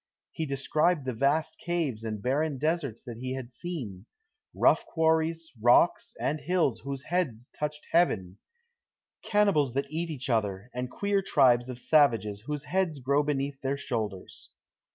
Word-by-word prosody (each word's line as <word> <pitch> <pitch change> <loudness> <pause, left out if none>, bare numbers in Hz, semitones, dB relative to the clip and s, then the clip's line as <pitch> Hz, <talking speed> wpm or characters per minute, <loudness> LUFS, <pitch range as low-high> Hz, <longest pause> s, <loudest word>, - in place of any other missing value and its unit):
He 160 - -3
described 150 +3 +1
the 130 - -2
vast 145 +6 +1
caves 160 -10 -2
and 110 -2 -4
barren 140 +3 0
deserts 150 -5 -1
that 120 -3 -8
he 130 +1 -3
had 130 -2 -7
seen; 120 - -6 0.4
rough - - +3
quarries, 160 0 0
rocks, 120 +9 +4
and 150 +2 -1
hills, 155 -7 +1
whose 140 0 -5
heads 140 -10 -2
touched 150 0 -5
heaven; 100 - +2 0.8
cannibals 200 - +2
that 140 +1 -1
eat 165 +2 -2
each 140 -5 -5
other, 105 -2 -1
and 125 0 -3
queer 200 +6 0
tribes 130 -8 +3
of 125 - -5
savages 115 -10 +3
whose 150 -1 -3
heads 180 -2 0
grow 140 +2 +2
beneath 140 -1 -2
their 135 +1 -1
shoulders. 110 -9 -5
140 Hz, 150 wpm, -28 LUFS, 120-160 Hz, 0.8 s, rocks